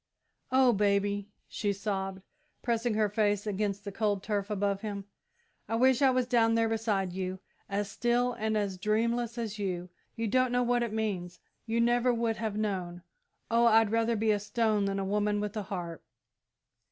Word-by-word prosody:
"Oh, 260 Hz, -2 st, +5 dB
Baby," 200 Hz, 0 st, +1 dB, 0.2 s
she 205 Hz, -2 st, -1 dB
sobbed, 195 Hz, -1 st, -3 dB, 0.4 s
pressing 235 Hz, -1 st, 0 dB
her 215 Hz, -1 st, +3 dB
face 205 Hz, -1 st, +1 dB
against 200 Hz, -1 st, -2 dB
the 200 Hz, -, -5 dB
cold 205 Hz, -1 st, 0 dB
turf 205 Hz, -1 st, -2 dB
above 200 Hz, -1 st, 0 dB
him, 200 Hz, -3 st, -5 dB, 0.6 s
"I 225 Hz, -, 0 dB
wish 260 Hz, +2 st, +4 dB
I 270 Hz, -, +6 dB
was 255 Hz, -1 st, +2 dB
down 230 Hz, -2 st, +3 dB
there 230 Hz, 0 st, +3 dB
beside 215 Hz, -5 st, -1 dB
you, 185 Hz, 0 st, -3 dB, 0.3 s
as 200 Hz, +1 st, -2 dB
still 245 Hz, +1 st, +1 dB
and 220 Hz, -1 st, -1 dB
as 195 Hz, -3 st, -2 dB
dreamless 230 Hz, +3 st, 0 dB
as 220 Hz, -3 st, -4 dB
you! 180 Hz, -3 st, -3 dB, 0.3 s
You 230 Hz, -1 st, -2 dB
don't 255 Hz, +3 st, +2 dB
know 245 Hz, 0 st, +2 dB
what 245 Hz, 0 st, +2 dB
it 235 Hz, -2 st, -1 dB
means 195 Hz, -5 st, -3 dB, 0.3 s
you 230 Hz, +1 st, 0 dB
never 240 Hz, +1 st, +3 dB
would 230 Hz, -1 st, 0 dB
have 215 Hz, -2 st, -3 dB
known! 180 Hz, -5 st, -3 dB, 0.5 s
Oh, 235 Hz, +1 st, +5 dB
I'd 225 Hz, -2 st, +5 dB
rather 230 Hz, +1 st, +2 dB
be 220 Hz, 0 st, +2 dB
a 205 Hz, -, +2 dB
stone 210 Hz, 0 st, +1 dB
than 195 Hz, 0 st, -1 dB
a 195 Hz, -, -1 dB
woman 210 Hz, +1 st, +1 dB
with 210 Hz, 0 st, -3 dB
a 215 Hz, -, -1 dB
heart!" 175 Hz, -4 st, -5 dB
215 Hz, 180 wpm, -30 LUFS, 200-230 Hz, 0.6 s, I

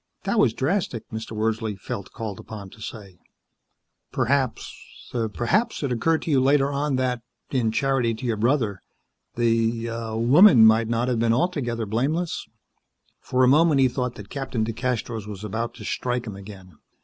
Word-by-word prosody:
"That 235 Hz, -, 0 dB
was 115 Hz, -, +3 dB
drastic," 140 Hz, -, -1 dB
Mr. 110 Hz, 0 st, -6 dB
Wordsley 110 Hz, 0 st, -1 dB
felt 100 Hz, +1 st, -6 dB
called 110 Hz, -4 st, -6 dB
upon 100 Hz, -3 st, -9 dB
to 110 Hz, -, -15 dB
say. 100 Hz, -5 st, -9 dB, 0.9 s
"Perhaps 130 Hz, -1 st, 0 dB, 0.6 s
perhaps 205 Hz, -, 0 dB
it 140 Hz, -, -1 dB
occurred 160 Hz, +7 st, +1 dB
to 165 Hz, -, -2 dB
you 135 Hz, -3 st, +4 dB
later 140 Hz, +1 st, +3 dB
on 140 Hz, 0 st, 0 dB
that, 125 Hz, -2 st, -1 dB, 0.3 s
in 120 Hz, -5 st, +1 dB
charity 125 Hz, -1 st, +1 dB
to 110 Hz, -, -7 dB
your 115 Hz, -2 st, 0 dB
brother, 110 Hz, -4 st, +1 dB, 0.5 s
the 115 Hz, 0 st, +1 dB
er 115 Hz, -1 st, -4 dB
woman 130 Hz, -, +7 dB
might 110 Hz, +1 st, +5 dB
not 115 Hz, +1 st, 0 dB
have 125 Hz, -3 st, 0 dB
been 115 Hz, 0 st, +3 dB
altogether 120 Hz, -6 st, -1 dB
blameless." 145 Hz, -, -1 dB, 0.7 s
For 130 Hz, 0 st, +1 dB
a -, -, +6 dB
moment 150 Hz, +2 st, +5 dB
he 130 Hz, -, +5 dB
thought 125 Hz, -1 st, -3 dB
that 100 Hz, -1 st, -10 dB
Captain 130 Hz, -5 st, -2 dB
DeCastros 115 Hz, -2 st, -3 dB
was 105 Hz, -1 st, -8 dB
about 115 Hz, +3 st, -3 dB
to 105 Hz, -, -10 dB
strike 125 Hz, +2 st, -2 dB
him 105 Hz, -4 st, -6 dB
again. 95 Hz, -4 st, -12 dB
120 Hz, 165 wpm, -24 LUFS, 110-135 Hz, 0.9 s, woman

